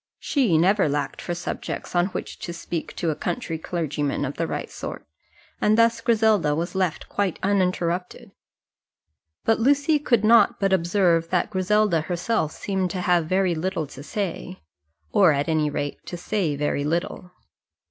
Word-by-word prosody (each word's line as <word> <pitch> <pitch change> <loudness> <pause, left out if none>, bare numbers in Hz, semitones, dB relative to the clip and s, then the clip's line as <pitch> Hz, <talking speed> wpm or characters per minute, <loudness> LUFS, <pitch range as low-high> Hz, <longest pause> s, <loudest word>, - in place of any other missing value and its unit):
She 245 - +1
never 190 +1 +3
lacked 145 -1 -2
for 175 - -3
subjects 180 - -5
on 175 +1 +3
which 195 - -6
to 170 - -5
speak 165 -1 -5
to 165 - -1
a - - -3
country 165 -7 -3
clergyman 150 -4 -2
of 140 - -4
the 165 - -2
right - - -4
sort, - - -7 0.6
and 215 +1 +3
thus 230 0 +3
Griselda 215 -9 +3
was 170 +3 -3
left 185 -4 -1
quite 200 -4 -1
uninterrupted. 180 -2 -1 1.1
But 225 - +3
Lucy 285 +5 +3
could 235 -7 +2
not 225 -1 +5
but 195 -1 +2
observe 170 -2 +2
that 180 +3 0
Griselda 190 -2 +2
herself 175 +1 -1
seemed 190 -2 -2
to 180 +1 -3
have 175 -3 +2
very 185 0 +2
little 165 0 -2
to 140 - -11
say, 185 +2 -5 0.5
or 185 -6 +5
at 140 +1 -1
any 155 -2 +1
rate 145 0 -4
to 175 - -5
say 175 -4 -1
very 145 0 -1
little. 170 +3 -2
180 Hz, 160 wpm, -24 LUFS, 160-205 Hz, 1.1 s, not